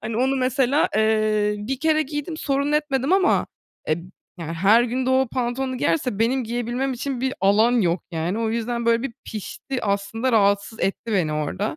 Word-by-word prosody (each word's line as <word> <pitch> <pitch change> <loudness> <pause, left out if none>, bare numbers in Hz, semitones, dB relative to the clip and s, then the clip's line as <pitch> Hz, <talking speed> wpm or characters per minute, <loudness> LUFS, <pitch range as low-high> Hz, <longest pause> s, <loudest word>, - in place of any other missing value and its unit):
Hani, 220 0 -4
onu 265 +3 +1
mesela, 260 +2 +2
eee, 215 -1 +2
1 250 +6 -4
kere 310 0 +3
giydim, 295 +2 -5
sorun 280 -1 -1
etmedim 295 -1 0
ama, 380 -1 +3 0.4
eee, 155 - +2
b - - -10 0.4
yani, 165 -1 -5
her 200 +8 +4
gün 250 +2 -2
de - - +2
o 260 -1 +3
pantolonu 255 +1 -2
giyerse 255 -10 0
benim 245 +3 +1
giyebilmem 240 +3 -2
için 255 0 -4
bir 265 +1 -1
alan 205 +5 +4
yok 175 -2 0
yani, 170 +4 -2
o 225 -1 0
yüzden 235 +1 -2
böyle 230 0 +3
bir 270 - -4
pişti 240 +4 -5
aslında 200 +5 -1
rahatsız 200 0 +2
etti 220 +3 -2
beni 175 -6 +1
orada. 170 - -2
235 Hz, 185 wpm, -23 LUFS, 210-265 Hz, 0.4 s, her